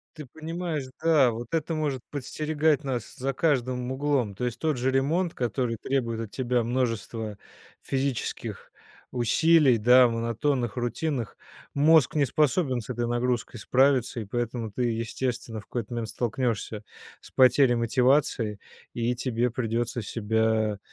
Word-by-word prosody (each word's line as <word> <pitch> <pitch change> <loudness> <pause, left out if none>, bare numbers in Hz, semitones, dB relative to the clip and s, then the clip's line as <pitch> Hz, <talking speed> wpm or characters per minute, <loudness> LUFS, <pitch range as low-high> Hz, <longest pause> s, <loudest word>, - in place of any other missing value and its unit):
Ты 155 -2 -8
понимаешь, 160 +2 -4 0.2
да, 155 -6 +4
вот 115 +3 -7
это 165 0 0
может 150 -5 -1
подстерегать 150 +2 0
нас 125 -6 -4
за 135 +2 -2
каждым 125 -4 0
углом. 130 -7 0
То 110 - -5
есть 120 -2 -2
тот 155 -2 0
же 130 +2 +1
ремонт, 160 +7 +1
который 120 -1 -1
требует 115 -2 -1
от 115 -3 -5
тебя 125 -2 0
множества 115 -3 -2 0.4
физических 135 -2 -3 0.4
усилий, 135 +2 +4
да, 125 +3 +6
монотонных, 115 +1 -1
рутинных. 120 0 -2 0.4
Мозг 155 -1 +4
не 145 -2 +3
способен 140 -1 +1
с 110 - -13
этой 120 -1 -2
нагрузкой 120 0 -1
справиться, 130 +1 +2
и 110 - -5
поэтому 115 +1 -3
ты, 125 +5 -2
естественно, 115 0 -3
в - - -19
какой-то 120 -1 -5
момент 115 -2 -3
столкнешься 115 -2 -2 0.4
с - - -15
потерей 130 0 +5
мотивации, 120 -2 +2 0.3
и 120 +1 -1
тебе 120 -1 0
придется 120 0 -2
себя 110 0 0
125 Hz, 140 wpm, -26 LUFS, 115-140 Hz, 0.4 s, да